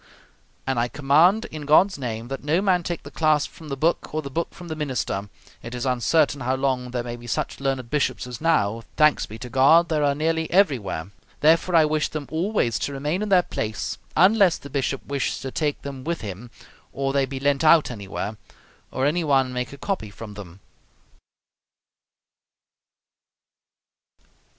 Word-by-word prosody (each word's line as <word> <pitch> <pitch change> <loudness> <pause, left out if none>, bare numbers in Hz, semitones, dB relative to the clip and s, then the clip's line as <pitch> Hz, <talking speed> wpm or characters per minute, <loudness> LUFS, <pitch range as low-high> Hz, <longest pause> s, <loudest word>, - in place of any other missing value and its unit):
And 130 -2 0
I 120 - +1
command, 155 - +3
in 150 -2 -7
God's 185 +4 +4
name, 115 -3 -4
that 135 0 -5
no 155 +4 +2
man 190 -3 +2
take 170 0 -4
the - - -10
clasp 155 -2 +1
from 160 -2 -12
the 135 - -3
book 160 +1 0
or 155 - -1
the 140 - -7
book 170 +4 -2
from 175 - -11
the 160 - -4
minister: 125 -9 -3 0.3
it 115 +2 -7
is 125 +2 -3
uncertain 140 +3 +2
how 130 +1 0
long 130 -2 -1
there 120 -1 -3
may 120 0 -5
be 120 0 -12
such 110 - -3
learned 135 -3 -2
bishops 150 -4 0
as 125 0 -8
now, 115 -10 +1 0.2
thanks 150 -1 +4
be 110 - -9
to 125 - -8
God, 140 +7 +5
there 155 -2 +1
are 140 -1 +2
nearly 160 +2 0
everywhere; 120 - +1 0.3
therefore, 165 +3 +4
I 160 -2 +6
wish 155 0 0
them 155 -2 -5
always 160 - 0
to 140 - -3
remain 150 +7 -2
in 210 - -2
their 185 -2 +5
place, 110 -8 -4 0.2
unless 190 0 +5
the 140 - -12
bishop 135 -1 -2
wish 140 -1 -2
to 135 - -5
take 150 0 -1
them 135 -2 -7
with 170 +3 -3
him, 105 +3 -7 0.4
or 135 0 -2
they 140 -1 +2
be 135 0 -5
lent 140 +2 +1
out 155 -3 +5
anywhere, 105 0 -5 0.5
or 130 - -1
any 165 +4 +1
one 135 -4 +2
make 125 -1 -3
a 140 - -10
copy 180 - -3
from 105 +1 -10
them. 100 -2 -11
140 Hz, 185 wpm, -24 LUFS, 125-160 Hz, 0.5 s, I